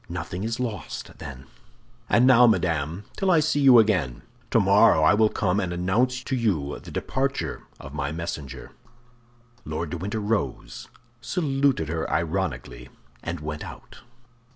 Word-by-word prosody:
"Nothing 90 Hz, +2 st, -5 dB
is 115 Hz, +2 st, -3 dB
lost, 110 Hz, -, -5 dB
then." 70 Hz, -4 st, -9 dB, 0.6 s
"And 120 Hz, -, +4 dB
now, 125 Hz, -1 st, +7 dB
madame, 85 Hz, -4 st, 0 dB
till 195 Hz, -2 st, 0 dB
I 170 Hz, -3 st, +5 dB
see 155 Hz, -1 st, +1 dB
you 135 Hz, -3 st, +7 dB
again! 90 Hz, -, +2 dB, 0.3 s
Tomorrow 80 Hz, -, +5 dB
I 80 Hz, -, +6 dB
will 110 Hz, +1 st, +4 dB
come 90 Hz, 0 st, 0 dB
and 90 Hz, -3 st, -2 dB
announce 115 Hz, +9 st, 0 dB
to 130 Hz, -, -2 dB
you 90 Hz, -, -1 dB
the -, -, -12 dB
departure 135 Hz, +1 st, -3 dB
of 70 Hz, +1 st, -10 dB
my 70 Hz, -1 st, -2 dB
messenger." 75 Hz, -5 st, -6 dB, 0.9 s
Lord 75 Hz, +1 st, -4 dB
de 85 Hz, -, -3 dB
Winter 100 Hz, +6 st, -3 dB
rose, 105 Hz, -, -3 dB, 0.3 s
saluted 135 Hz, -, 0 dB
her 80 Hz, 0 st, -2 dB
ironically, 70 Hz, -8 st, -2 dB, 0.3 s
and 85 Hz, -2 st, -5 dB
went 75 Hz, 0 st, -5 dB
out. -, -, -11 dB
90 Hz, 145 wpm, -25 LUFS, 75-120 Hz, 0.9 s, now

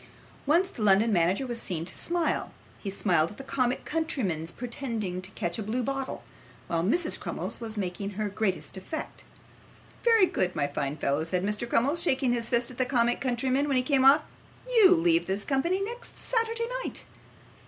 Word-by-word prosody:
Once 340 Hz, +6 st, +4 dB
the 240 Hz, -, -9 dB
London 210 Hz, +2 st, +4 dB
manager 180 Hz, +8 st, +2 dB
was 240 Hz, -2 st, -4 dB
seen 165 Hz, -3 st, -3 dB
to 185 Hz, -, -6 dB
smile 345 Hz, -1 st, -1 dB, 0.3 s
he 200 Hz, -, -5 dB
smiled 175 Hz, -5 st, +2 dB
at 210 Hz, -, -13 dB
the 270 Hz, -, -7 dB
comic 255 Hz, -2 st, -1 dB
countryman's 210 Hz, -, -1 dB
pretending 230 Hz, -7 st, -4 dB
to 190 Hz, -, -8 dB
catch 175 Hz, -1 st, -2 dB
a -, -, -1 dB
blue 225 Hz, +4 st, -2 dB
bottle, 270 Hz, +2 st, -3 dB, 0.4 s
while 165 Hz, -1 st, -1 dB
Mrs 320 Hz, -, +1 dB
Crummles -, -, -5 dB
was 225 Hz, -1 st, -2 dB
making 195 Hz, 0 st, -3 dB
her 215 Hz, -1 st, 0 dB
greatest 190 Hz, -6 st, -2 dB
effect. 190 Hz, +12 st, -6 dB, 0.8 s
'Very 455 Hz, -4 st, +6 dB
good, 185 Hz, -, -1 dB
my -, -, +1 dB
fine 145 Hz, 0 st, -3 dB
fellow,' 140 Hz, +1 st, 0 dB
said 180 Hz, +2 st, -1 dB
Mr. 210 Hz, +4 st, -1 dB
Crummles, 285 Hz, +10 st, +2 dB
shaking 260 Hz, -6 st, +2 dB
his 235 Hz, -1 st, -1 dB
fist 235 Hz, 0 st, +1 dB
at 250 Hz, -, -12 dB
the -, -, +4 dB
comic 240 Hz, -2 st, +1 dB
countryman 260 Hz, +2 st, +1 dB
when 275 Hz, -2 st, +2 dB
he 255 Hz, -, +3 dB
came 265 Hz, 0 st, +2 dB
off, 280 Hz, +3 st, +7 dB, 0.4 s
'you 435 Hz, -7 st, +6 dB
leave 335 Hz, 0 st, +2 dB
this 195 Hz, +2 st, 0 dB
company 340 Hz, +8 st, +1 dB
next 475 Hz, +3 st, -7 dB
Saturday 460 Hz, -1 st, 0 dB, 0.2 s
night. -, -, -5 dB
240 Hz, 185 wpm, -28 LUFS, 190-290 Hz, 0.8 s, off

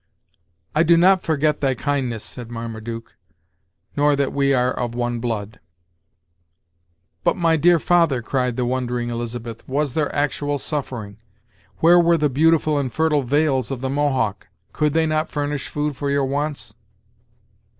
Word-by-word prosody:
"I 155 Hz, -, +3 dB
do 170 Hz, 0 st, +5 dB
not 185 Hz, +2 st, +5 dB
forget 150 Hz, -1 st, 0 dB
thy 135 Hz, -2 st, +1 dB
kindness," 130 Hz, -5 st, -2 dB
said 120 Hz, -2 st, -8 dB
Marmaduke, 115 Hz, 0 st, -7 dB, 0.8 s
"nor 145 Hz, 0 st, +3 dB
that 140 Hz, -1 st, -1 dB
we 140 Hz, 0 st, +2 dB
are 125 Hz, -1 st, +2 dB
of 120 Hz, -1 st, -3 dB
one 120 Hz, -1 st, -2 dB
blood." 110 Hz, -3 st, -4 dB, 1.6 s
"But, -, -, +2 dB
my 165 Hz, -2 st, +3 dB
dear 170 Hz, +2 st, +4 dB
father," 165 Hz, -7 st, +2 dB
cried 125 Hz, 0 st, -1 dB
the 125 Hz, 0 st, -1 dB
wondering 125 Hz, -1 st, -2 dB
Elizabeth, 115 Hz, -1 st, -5 dB
"was 140 Hz, 0 st, 0 dB
there 155 Hz, -2 st, 0 dB
actual 145 Hz, 0 st, 0 dB
suffering? 120 Hz, -8 st, -5 dB, 0.6 s
Where 175 Hz, +2 st, +7 dB
were 170 Hz, 0 st, +4 dB
the 150 Hz, -1 st, +1 dB
beautiful 155 Hz, +1 st, +2 dB
and 130 Hz, -3 st, -2 dB
fertile 155 Hz, +1 st, +1 dB
vales 135 Hz, -1 st, +1 dB
of 135 Hz, -3 st, -4 dB
the 130 Hz, 0 st, -2 dB
Mohawk? 135 Hz, -8 st, 0 dB, 0.3 s
Could 150 Hz, -2 st, +1 dB
they 160 Hz, 0 st, +2 dB
not 155 Hz, 0 st, 0 dB
furnish 145 Hz, -1 st, -3 dB
food 150 Hz, -1 st, -2 dB
for 140 Hz, +2 st, -3 dB
your 140 Hz, -1 st, +1 dB
wants?" 145 Hz, +2 st, -3 dB
140 Hz, 150 wpm, -21 LUFS, 120-150 Hz, 1.6 s, Where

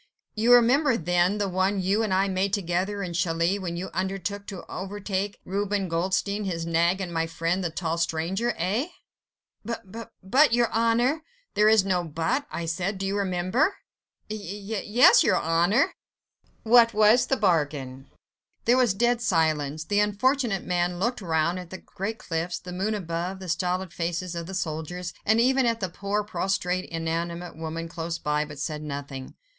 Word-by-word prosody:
"You 230 Hz, +3 st, +4 dB
remember, 250 Hz, +2 st, +4 dB
then, 180 Hz, +3 st, +1 dB
the 205 Hz, -1 st, 0 dB
one 190 Hz, +2 st, 0 dB
you 195 Hz, +4 st, +1 dB
and 215 Hz, -3 st, -1 dB
I 190 Hz, +1 st, +3 dB
made 190 Hz, +1 st, -1 dB
together 195 Hz, +2 st, -1 dB
in 175 Hz, -2 st, -4 dB
Calais, 170 Hz, +3 st, +1 dB
when 170 Hz, -3 st, -4 dB
you 185 Hz, +2 st, -5 dB
undertook 195 Hz, +2 st, -3 dB
to 195 Hz, -4 st, -7 dB
overtake 200 Hz, +1 st, -4 dB
Reuben 200 Hz, 0 st, -1 dB
Goldstein, 190 Hz, +5 st, 0 dB
his 165 Hz, -3 st, -3 dB
nag 170 Hz, +3 st, +2 dB
and 180 Hz, -3 st, -4 dB
my 165 Hz, 0 st, 0 dB
friend 165 Hz, +3 st, -1 dB
the 175 Hz, -, 0 dB
tall 165 Hz, 0 st, -2 dB
stranger? 175 Hz, +8 st, -1 dB
Eh?" 200 Hz, -, 0 dB, 0.8 s
"B... 235 Hz, +2 st, -3 dB
b... 220 Hz, +5 st, -8 dB, 0.2 s
but... 260 Hz, +7 st, +4 dB
your 240 Hz, -1 st, +2 dB
Honour.. 235 Hz, +6 st, +2 dB, 0.2 s
." -, -, -39 dB
"There 210 Hz, +1 st, +4 dB
is 215 Hz, -3 st, +5 dB
no 180 Hz, -2 st, +1 dB
'but.' 165 Hz, -, -1 dB
I 170 Hz, -, -4 dB
said, 175 Hz, +4 st, -2 dB
do 195 Hz, -, -3 dB
you 195 Hz, +1 st, -1 dB
remember?" 195 Hz, -, +1 dB, 0.5 s
"Y... 215 Hz, -, -4 dB
y... 200 Hz, 0 st, -7 dB, 0.2 s
y... -, -, -4 dB
yes... 230 Hz, +4 st, +7 dB
your -, -, +3 dB
Honour!" 170 Hz, +6 st, +2 dB, 0.7 s
"What 230 Hz, 0 st, +5 dB
was 215 Hz, +3 st, +5 dB
the 270 Hz, -, +1 dB
bargain?" 145 Hz, -8 st, 0 dB, 0.6 s
There 240 Hz, +2 st, +4 dB
was 245 Hz, -7 st, +3 dB
dead 240 Hz, +2 st, +2 dB
silence. 155 Hz, -6 st, +1 dB
The 205 Hz, +3 st, +1 dB
unfortunate 215 Hz, +1 st, +1 dB
man 175 Hz, 0 st, 0 dB
looked 235 Hz, +5 st, -1 dB
round 170 Hz, 0 st, 0 dB
at 180 Hz, -2 st, -9 dB
the 185 Hz, -, -7 dB
great 205 Hz, +5 st, -5 dB
cliffs, 170 Hz, -1 st, -3 dB
the 180 Hz, 0 st, -9 dB
moon 200 Hz, +4 st, -1 dB
above, 175 Hz, 0 st, -3 dB
the 190 Hz, -1 st, -9 dB
stolid 180 Hz, +1 st, -1 dB
faces 170 Hz, +2 st, -3 dB
of 170 Hz, -1 st, -5 dB
the 190 Hz, -, -6 dB
soldiers, 175 Hz, +1 st, -4 dB
and 220 Hz, +2 st, +4 dB
even 260 Hz, +1 st, +3 dB
at 230 Hz, -1 st, 0 dB
the 190 Hz, -3 st, -2 dB
poor, 200 Hz, +4 st, -2 dB
prostrate, 185 Hz, -3 st, -1 dB
inanimate 170 Hz, +1 st, -3 dB
woman 165 Hz, +1 st, -5 dB
close 165 Hz, 0 st, -4 dB
by, 150 Hz, -1 st, 0 dB
but 150 Hz, -1 st, -9 dB
said 150 Hz, +1 st, -3 dB
nothing. 140 Hz, -3 st, -6 dB
185 Hz, 180 wpm, -26 LUFS, 170-210 Hz, 0.8 s, yes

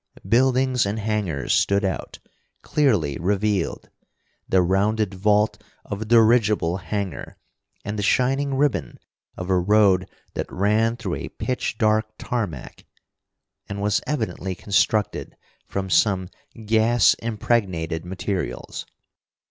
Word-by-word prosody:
Buildings 130 Hz, +1 st, +3 dB
and 100 Hz, +2 st, -2 dB
hangars 105 Hz, -9 st, -1 dB
stood 100 Hz, +1 st, +2 dB
out, 95 Hz, -, -4 dB, 0.5 s
clearly 105 Hz, -, +1 dB
revealed; 100 Hz, 0 st, -1 dB, 0.6 s
the 95 Hz, -1 st, +4 dB
rounded 100 Hz, +3 st, +1 dB
vault 105 Hz, +1 st, +1 dB, 0.2 s
of 100 Hz, +1 st, -5 dB
a -, -, -3 dB
dirigible 110 Hz, -6 st, +3 dB
hangar, 95 Hz, +1 st, -5 dB, 0.5 s
and 105 Hz, +1 st, -3 dB
the -, -, 0 dB
shining 135 Hz, +5 st, +1 dB
ribbon 135 Hz, -, 0 dB, 0.4 s
of 90 Hz, +1 st, -4 dB
a 90 Hz, -, +4 dB
road 95 Hz, -1 st, +3 dB, 0.2 s
that -, -, -4 dB
ran 110 Hz, +4 st, +1 dB
through 100 Hz, -7 st, -4 dB
a -, -, -6 dB
pitch 130 Hz, 0 st, -3 dB
dark 110 Hz, -1 st, +2 dB
tarmac, 100 Hz, -, -4 dB, 0.9 s
and 100 Hz, -, -4 dB
was 105 Hz, 0 st, +1 dB
evidently 95 Hz, -9 st, -2 dB
constructed 105 Hz, +2 st, 0 dB, 0.3 s
from 95 Hz, -1 st, -3 dB
some 95 Hz, 0 st, +2 dB, 0.4 s
gas 110 Hz, +1 st, +4 dB
impregnated 100 Hz, -7 st, -1 dB
materials. 95 Hz, +1 st, -4 dB
105 Hz, 115 wpm, -23 LUFS, 95-115 Hz, 0.9 s, the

